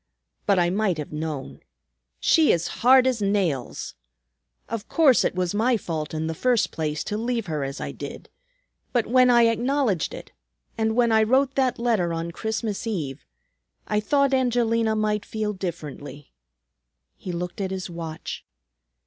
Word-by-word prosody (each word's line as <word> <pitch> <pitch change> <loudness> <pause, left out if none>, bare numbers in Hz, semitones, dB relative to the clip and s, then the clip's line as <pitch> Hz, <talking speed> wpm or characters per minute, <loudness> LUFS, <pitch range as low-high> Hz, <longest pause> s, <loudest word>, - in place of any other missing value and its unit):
But 200 -2 +4
I 175 -1 +3
might 195 -3 +1
have 150 0 -6
known. 150 -3 -5 0.6
She 320 -2 +4
is 170 -1 +1
hard 255 +2 +7
as 255 -4 +1
nails! 190 -10 -1 0.7
Of 225 -3 -5
course, 290 -7 +5
it - - 0
was 180 0 -1
my 230 +4 +2
fault 160 -6 -4
in 155 0 -2
the 160 - -2
first 245 +6 +1
place 155 -2 -2
to 210 0 -3
leave 235 -1 -1
her 155 -5 -2
as 135 +1 -5
I - - -4
did. - - -8 0.7
But 240 -3 +2
when 255 +1 +4
I 240 -1 +6
acknowledged 230 - +1
it, - - -11 0.4
and 220 0 0
when 235 -1 +3
I 220 0 +5
wrote 260 +5 +3
that 260 -2 +1
letter 220 -8 +1
on 165 +1 -3
Christmas 220 +2 -3
Eve, 155 - -4 0.6
I 210 - 0
thought 280 +5 +2
Angelina 230 -3 +2
might 210 -1 0
feel 215 -1 -3
differently." 150 -6 -7 0.8
He 185 - -7
looked 175 +3 -4
at 190 - -1
his 190 -1 -4
watch. 165 -2 -6
210 Hz, 160 wpm, -24 LUFS, 170-235 Hz, 0.8 s, hard